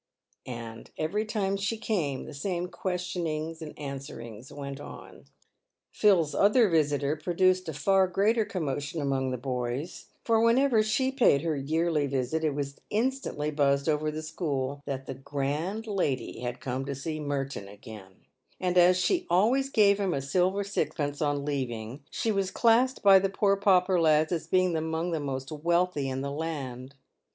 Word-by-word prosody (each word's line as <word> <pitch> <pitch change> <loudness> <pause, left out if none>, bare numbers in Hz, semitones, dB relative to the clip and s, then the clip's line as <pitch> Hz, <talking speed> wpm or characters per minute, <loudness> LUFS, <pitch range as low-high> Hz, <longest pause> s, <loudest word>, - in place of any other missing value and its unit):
And 115 -2 -7
every 200 +8 -1
time 200 -3 -1
she 205 +3 -2
came 170 - -2
the - - -9
same 175 +4 -3
questionings 170 -4 -3
and 155 -2 -8
answerings 135 -5 -8
went 140 -1 -6
on. - - -11 0.7
Phil's 180 -8 +3
other 210 +3 +5
visitor 145 -3 +1
produced 185 +2 +1
a - - -4
far 190 +5 +3
greater 210 +5 +2
commotion 160 -5 -3
among 135 -2 0
the 130 - -2
boys: 125 +4 -4 0.2
for 225 -1 +3
whenever 230 0 +4
she 240 +5 +1
paid 230 - +3
her 160 -2 0
yearly 155 +1 0
visit, 135 +4 -1
it 150 -3 0
was 140 -1 -4
instantly 225 - -1
buzzed 140 -1 +1
over 155 0 +1
the 155 +1 -5
school 145 -4 -3
that 135 -1 -4
the - - -5
grand 145 - -3
lady 185 - -2
had 120 0 -4
come 130 +1 -3
to 140 0 -4
see 155 +3 -4
Merton 140 -7 -3
again; 100 -1 -13 0.3
and 180 -1 +2
as 180 +1 +6
she 345 - +1
always 235 +10 +3
gave 205 -5 +4
him 195 -5 0
a 135 - -1
silver 185 +7 +1
sixpence 145 -7 -2
on 145 -1 0
leaving, 130 -3 -3
she 225 - -1
was 195 -2 0
classed 240 +5 +3
by 195 -1 +8
the 195 +1 0
poor 195 +1 +2
pauper 190 -2 +3
lads 155 0 +3
as 170 -2 -2
being 185 -2 +2
among 160 +2 -2
the 165 - -1
most 135 -1 -4
wealthy 170 -2 0
in 130 0 -3
the 140 0 -3
land. 140 -4 -5
155 Hz, 165 wpm, -28 LUFS, 140-195 Hz, 0.7 s, by